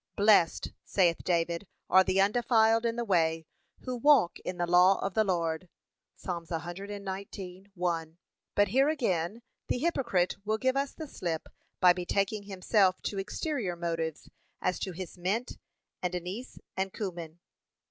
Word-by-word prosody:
'Blessed,' 200 -5 +4
saith 175 -4 +2
David, 170 +1 0 0.2
'are 190 - +6
the 190 +1 +1
undefiled 225 +2 +3
in 230 - -1
the 240 0 -2
way, 165 -4 +1 0.4
who 255 -1 -4
walk 270 -7 +4
in 180 - -5
the 175 - 0
law 180 +2 +5
of 195 - -3
the 220 - +3
Lord.' 170 -3 -1 0.5
(Ps. - - -19
119:1) 180 -1 -5 0.4
But 205 0 +4
here 270 +7 +4
again 225 - -1 0.2
the - - 0
hypocrite 245 - +1
will 215 +1 0
give 260 +3 +1
us 275 0 -1
the 315 - -7
slip 170 - -4 0.3
by 180 -1 +7
betaking 200 +3 -1
himself 190 -1 +2
to 200 - -2
exterior 210 - -2
matters, 165 -2 -3 0.3
as 180 - -1
to 190 - -3
his 180 0 -8
'mint 205 +8 -2 0.4
and 180 0 -1
anise 185 +8 -6 0.2
and 190 0 -1
cummin.' 175 -6 -6
190 Hz, 145 wpm, -30 LUFS, 175-220 Hz, 0.5 s, by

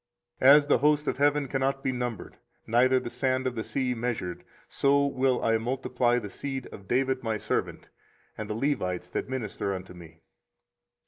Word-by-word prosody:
24:033:022 130 - +8
As 150 -1 +4
the 145 - +4
host 150 +2 +3
of - - 0
heaven 145 0 +2
cannot 135 +1 -1
be 130 - +1
numbered, 125 -3 -5 0.3
neither 130 +3 +4
the 120 - -7
sand 130 +1 0
of 130 - 0
the 110 -2 -4
sea 130 0 -1
measured: 115 -7 -3 0.2
so 140 0 +2
will 130 -2 +1
I 115 0 +2
multiply 125 0 0
the 115 - -3
seed 135 +1 -5
of 100 -1 -11
David 130 +3 +1
my 110 -3 -1
servant, - - -3 0.5
and 110 -1 -6
the 105 - -2
Levites 90 -9 -1
that - - -3
minister 105 -6 -3
unto 95 0 -8
me. 80 -2 -14
125 Hz, 180 wpm, -27 LUFS, 110-135 Hz, 0.5 s, 24:033:022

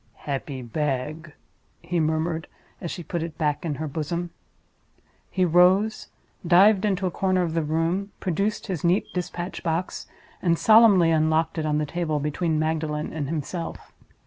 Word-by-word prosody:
"Happy 135 -2 -4
bag!" 150 +5 -3 0.5
he 175 -1 -2
murmured, 160 +1 -1 0.3
as 170 - -4
she 175 - -6
put 170 +2 -3
it 165 -1 -5
back 150 0 0
in 160 -4 -2
her 155 +2 -4
bosom. 170 +4 -3 1.0
He 185 -1 +1
rose; 185 +5 +3 0.4
dived 195 +4 +6
into 195 -2 0
a 180 - 0
corner 185 0 +1
of 165 -2 -2
the 165 - +1
room; 165 +6 -1
produced 195 +4 -1
his 180 -7 -4
neat 175 +3 +2
dispatch 180 0 -4
box; 170 +1 -3 0.3
and 170 -2 +2
solemnly 215 -6 +6
unlocked 160 +1 +1
it 155 - -1
on 150 0 +1
the 150 - 0
table 155 -1 -2
between 155 +2 -1
Magdalen 155 -1 -1
and 145 -3 -3
himself. 165 +2 -5
165 Hz, 155 wpm, -25 LUFS, 155-180 Hz, 1.0 s, dived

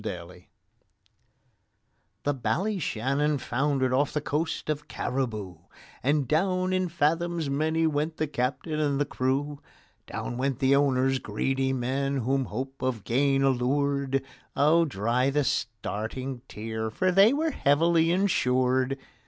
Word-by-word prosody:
THE 145 - +1
Ballyshannon 145 - 0
foundered 130 0 0
off 140 +2 +1
the 150 - +1
coast 150 +2 -2
of 150 -1 -3
Cariboo, 110 -9 -3 0.4
And 140 +1 +1
down 185 +5 +1
in 185 -1 0
fathoms 165 -1 0
many 160 +3 +1
went 155 +1 -1
the 155 - 0
captain 140 +3 -2
and 145 -2 +1
the 145 - +2
crew; 140 +2 -2 0.5
Down 120 - -5
went 135 0 0
the 135 0 +3
owners—greedy 135 -1 +1
men 135 +2 -1
whom 135 +2 0
hope 130 +5 -6
of 125 -5 -2
gain 135 +5 +2
allured: 135 +1 +1 0.3
Oh, 155 +4 +4
dry 125 +1 0
the 145 +1 +1
starting 125 -1 -3
tear, 110 +1 -4
for 185 +12 +1
they 195 +5 +6
were 310 +3 0
heavily 165 - +3
insured. 130 -8 +2
140 Hz, 120 wpm, -27 LUFS, 130-155 Hz, 0.5 s, they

